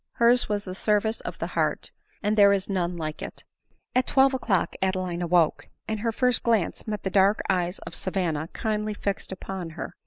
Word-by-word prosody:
Her's 235 Hz, 0 st, +4 dB
was 205 Hz, -1 st, -1 dB
the 185 Hz, -, -6 dB
service 210 Hz, +3 st, +1 dB
of -, -, -6 dB
the -, -, -3 dB
heart; -, -, 0 dB, 0.3 s
and 210 Hz, +1 st, +2 dB
there 200 Hz, -1 st, +7 dB
is 195 Hz, -1 st, 0 dB
none 175 Hz, -2 st, -1 dB
like 155 Hz, -2 st, -4 dB
it. -, -, -8 dB, 0.5 s
At 255 Hz, 0 st, +2 dB
twelve 270 Hz, 0 st, +4 dB
o'clock 210 Hz, -9 st, 0 dB
Adeline 185 Hz, -2 st, -1 dB
awoke; 170 Hz, -2 st, +2 dB, 0.2 s
and 220 Hz, -1 st, -2 dB
her 230 Hz, +2 st, 0 dB
first 250 Hz, +2 st, +2 dB
glance 225 Hz, -3 st, 0 dB
met 210 Hz, -2 st, -3 dB
the 190 Hz, -, -2 dB
dark 200 Hz, +2 st, +4 dB
eyes 180 Hz, 0 st, 0 dB
of 170 Hz, -, -8 dB
Savanna 175 Hz, -6 st, -1 dB
kindly 215 Hz, +2 st, -2 dB
fixed 200 Hz, -1 st, -3 dB
upon 190 Hz, -2 st, -5 dB
her. -, -, -5 dB
200 Hz, 190 wpm, -26 LUFS, 180-215 Hz, 0.5 s, there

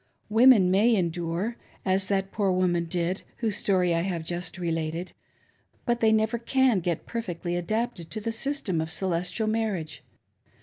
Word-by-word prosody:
Women 225 Hz, -4 st, +6 dB
may 220 Hz, +5 st, +4 dB
endure, 175 Hz, +4 st, -1 dB, 0.3 s
as 190 Hz, 0 st, +2 dB
that 195 Hz, -1 st, 0 dB
poor 200 Hz, -3 st, +1 dB
woman 180 Hz, -2 st, +1 dB
did 175 Hz, +2 st, -2 dB, 0.2 s
whose 220 Hz, -4 st, -1 dB
story 185 Hz, -4 st, +2 dB
I 165 Hz, -, +1 dB
have 175 Hz, -2 st, -2 dB
just 175 Hz, +2 st, -4 dB
related, 165 Hz, 0 st, -2 dB, 0.7 s
but 240 Hz, 0 st, +1 dB
they 220 Hz, -1 st, +4 dB
never 220 Hz, +1 st, +2 dB
can 255 Hz, -2 st, +2 dB
get 170 Hz, -2 st, -2 dB
perfectly 175 Hz, -6 st, -4 dB
adapted 205 Hz, 0 st, -2 dB
to 220 Hz, -, -4 dB
the 225 Hz, +2 st, -3 dB
system 225 Hz, -, -1 dB
of 160 Hz, -, -4 dB
"Celestial 180 Hz, +3 st, 0 dB
Marriage." 215 Hz, -8 st, -2 dB
190 Hz, 150 wpm, -27 LUFS, 175-220 Hz, 0.7 s, Women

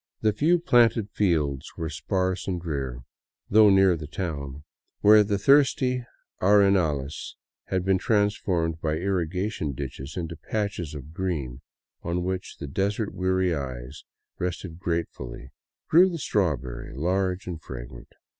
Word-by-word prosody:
The 110 Hz, -1 st, +2 dB
few 160 Hz, +10 st, +3 dB
planted 120 Hz, -, +3 dB
fields 80 Hz, -10 st, 0 dB
were 80 Hz, -, -3 dB
sparse 90 Hz, +4 st, -1 dB
and 90 Hz, -2 st, -1 dB
drear, 70 Hz, -7 st, -4 dB, 0.5 s
though 105 Hz, 0 st, +7 dB
near 95 Hz, -2 st, +5 dB
the 75 Hz, -2 st, -7 dB
town, 75 Hz, -5 st, -5 dB, 0.4 s
where 105 Hz, +1 st, +7 dB
the 100 Hz, 0 st, 0 dB
thirsty 130 Hz, +1 st, +3 dB, 0.4 s
arenales 90 Hz, -8 st, +2 dB, 0.3 s
had 95 Hz, -1 st, -1 dB
been 95 Hz, -1 st, +3 dB
transformed 95 Hz, -6 st, 0 dB
by 75 Hz, -1 st, 0 dB
irrigation 90 Hz, -2 st, -2 dB
into 75 Hz, +5 st, -5 dB
patches 100 Hz, -7 st, -2 dB
of 75 Hz, +2 st, -9 dB
green 75 Hz, -9 st, -3 dB, 0.4 s
on 85 Hz, +1 st, -2 dB
which 95 Hz, 0 st, -4 dB
the -, -, -6 dB
desert 100 Hz, -, -1 dB
weary 95 Hz, -1 st, +1 dB
eyes 65 Hz, -2 st, -6 dB, 0.4 s
rested 90 Hz, -1 st, -4 dB
gratefully, 65 Hz, -8 st, -4 dB, 0.4 s
grew 180 Hz, +4 st, +6 dB
the 170 Hz, -, -4 dB
strawberry, 70 Hz, -, -2 dB
large 90 Hz, +5 st, 0 dB
and 85 Hz, -3 st, -6 dB
fragrant. -, -, -9 dB
90 Hz, 125 wpm, -26 LUFS, 75-100 Hz, 0.5 s, though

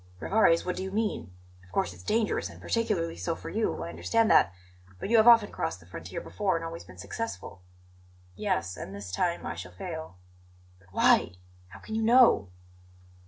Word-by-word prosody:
"Rivarez, 195 Hz, -, +3 dB
what 180 Hz, -, -2 dB
do -, -, -3 dB
you 190 Hz, -, -3 dB
mean? 210 Hz, -, -2 dB, 0.3 s
Of 90 Hz, -, -21 dB
course 90 Hz, -2 st, 0 dB
it's 90 Hz, -, -14 dB
dangerous, 215 Hz, -, 0 dB
and -, -, -13 dB
particularly 210 Hz, -8 st, -1 dB
so 85 Hz, +1 st, -2 dB
for -, -, -8 dB
you; -, -, -1 dB
I 85 Hz, -, -5 dB
understand 90 Hz, -, +1 dB
that; -, -, +6 dB, 0.5 s
but -, -, -4 dB
you 235 Hz, -, +6 dB
have 220 Hz, +1 st, +5 dB
often 230 Hz, -3 st, +7 dB
crossed -, -, -3 dB
the 80 Hz, -, -18 dB
frontier 90 Hz, 0 st, -7 dB
before 195 Hz, -4 st, -1 dB
and 165 Hz, 0 st, -3 dB
always 165 Hz, 0 st, -6 dB
been 90 Hz, -, -15 dB
successful." 100 Hz, 0 st, -6 dB, 0.7 s
"Yes, 90 Hz, +1 st, -1 dB
and 100 Hz, -, -7 dB
this 100 Hz, -2 st, -7 dB
time 175 Hz, -, -1 dB
I -, -, -3 dB
shall 90 Hz, +1 st, -9 dB
fail." 160 Hz, -, -7 dB, 0.6 s
"But 95 Hz, -1 st, -24 dB
why? 90 Hz, -, +4 dB, 0.3 s
How 95 Hz, +2 st, -13 dB
can -, -, -8 dB
you 220 Hz, -, 0 dB
know?" 230 Hz, -, +5 dB
160 Hz, 190 wpm, -28 LUFS, -, 0.7 s, often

